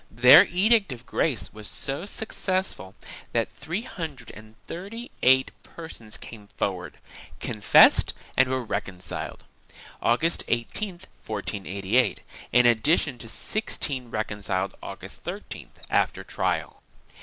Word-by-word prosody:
2 115 - -19
Their 140 +8 +11
Edict 200 - +3
of 125 -1 -8
Grace 115 - -1
was 105 0 -9
so 140 +6 -4
successful 190 - -2 0.4
that - - 0
three 175 +8 -4
hundred 155 - -7
and 110 +1 -14
thirty 210 +8 -7
eight 130 +1 +5
persons 120 -10 -7
came 105 -3 -11
forward, 90 -5 -3 0.4
confessed 110 -2 +5 0.2
and 130 0 +4
were 130 -1 -1
reconciled, 95 -4 -5 0.6
August 155 +9 +2
18, 150 - -2 0.3
1488, 100 +2 -1 0.3
in 125 0 +5
addition 120 +3 +3
to 115 - -9
sixteen 135 - 0
reconciled, 100 -4 -2
August - - -8
13th, - - -7
after - - +1
trial. - - -2
125 Hz, 115 wpm, -26 LUFS, 110-165 Hz, 0.6 s, Their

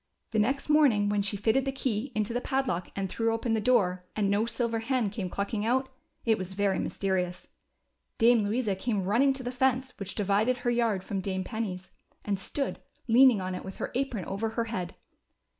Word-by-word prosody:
The 220 - +1
next 265 +6 +1
morning 275 -10 +4
when 205 0 +1
she 200 +1 -1
fitted 225 +6 +2
the 270 - -1
key 260 -2 -2
into 215 +1 0
the 245 - -1
padlock 265 - -1
and 195 -1 -1
threw 225 +4 0
open 225 +1 -1
the 220 - +1
door, 185 -6 +2
and 200 -2 +1
no 210 +3 +2
silver 235 -1 -1
hen 230 -3 0
came 195 -3 -4
clucking 200 +3 -2
out, 260 +4 +1 0.4
it 225 -3 +3
was 185 0 -5
very 195 -1 +1
mysterious. 180 -2 -2 0.7
Dame 230 -1 +5
Louisa 215 0 0
came 205 0 -1
running 235 +9 +3
to 265 -1 -8
the 245 - -3
fence 260 0 +1
which 200 -1 -5
divided 210 +5 +2
her 245 0 0
yard 230 -5 +1
from 195 0 -3
Dame 190 0 -2
Penny's, 190 -4 -4 0.3
and 200 -2 -1
stood 275 +8 -3 0.3
leaning 245 -2 +6
on 185 0 -3
it 180 - -5
with 190 - -7
her - - -4
apron 250 -6 -2
over 200 +3 -2
her 230 +1 -1
head. 190 -6 -4
220 Hz, 200 wpm, -29 LUFS, 195-245 Hz, 0.7 s, leaning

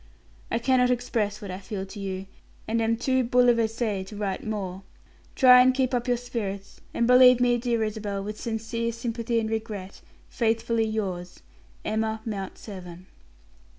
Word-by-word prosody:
"I - - 0
cannot 250 +1 +3
express 225 -4 -1
what 195 - -5
I 185 - -5
feel 195 -1 -5
for 200 +2 -10
you, 190 -1 -4 0.4
and 230 +1 0
am 225 0 +1
too 260 +2 +1
bouleversee 230 -4 +2
to 210 - -10
write 200 -2 -3
more. 195 -4 -4 0.5
Try 250 -2 +8
and 255 0 +4
keep 260 -1 +1
up 245 0 0
your 245 -1 +2
spirits, 205 -5 -5
and 235 - 0
believe 250 0 +7
me, 245 -1 +3
dear 235 -2 0
Isabel, 205 -2 -3
with 210 +1 -6
sincere 230 +1 -2
sympathy 230 0 -2
and 220 - -2
regret, 215 -4 -5 0.3
faithfully 230 -1 0
yours, 185 -5 -4 0.4
"EMMA 220 0 -1
MOUNT 200 -4 -5
SEVERN." 180 -3 -10
225 Hz, 155 wpm, -26 LUFS, 200-240 Hz, 0.5 s, Try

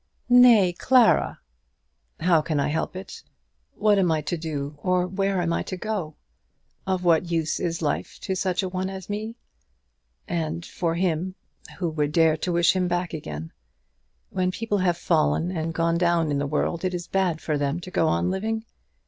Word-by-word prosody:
"Nay, 235 -7 +7
Clara." 245 +5 +3 0.8
"How 165 -1 +4
can 155 -1 -1
I 140 - +1
help 160 +4 -2
it? 190 +1 -8 0.5
What 210 -1 +3
am 180 -3 +3
I 155 -1 +1
to 150 - -2
do, 150 -3 -5
or 180 -1 +1
where 195 +1 -1
am 170 0 0
I - - 0
to 185 - -5
go? 185 -7 -3 0.7
Of 185 -1 0
what 170 0 +3
use 165 -2 0
is 170 -2 -2
life 150 - -2
to 190 - -2
such 185 0 0
a - - -1
one 185 +1 -3
as 190 0 -7
me? 215 +2 -4 0.9
And 165 0 -3
for 165 -2 -2
him, 180 +1 -1 0.4
who 180 - -1
would 150 -1 -1
dare 160 -1 +4
to 175 +3 -3
wish 170 +1 +3
him 185 -1 +1
back 175 0 -2
again? 80 - -6 0.8
When 185 0 0
people 205 +1 -2
have 175 -2 +1
fallen 165 +1 +1
and 165 -2 -2
gone 165 +1 0
down 170 -3 +2
in 140 - 0
the 140 - -1
world 155 +4 -1
it 185 -1 -1
is 175 -1 -4
bad 185 -4 0
for 155 - -2
them 145 +3 -1
to 185 - -9
go 165 - +2
on 180 +3 +1
living. 220 +4 -2
175 Hz, 185 wpm, -25 LUFS, 160-190 Hz, 0.9 s, Nay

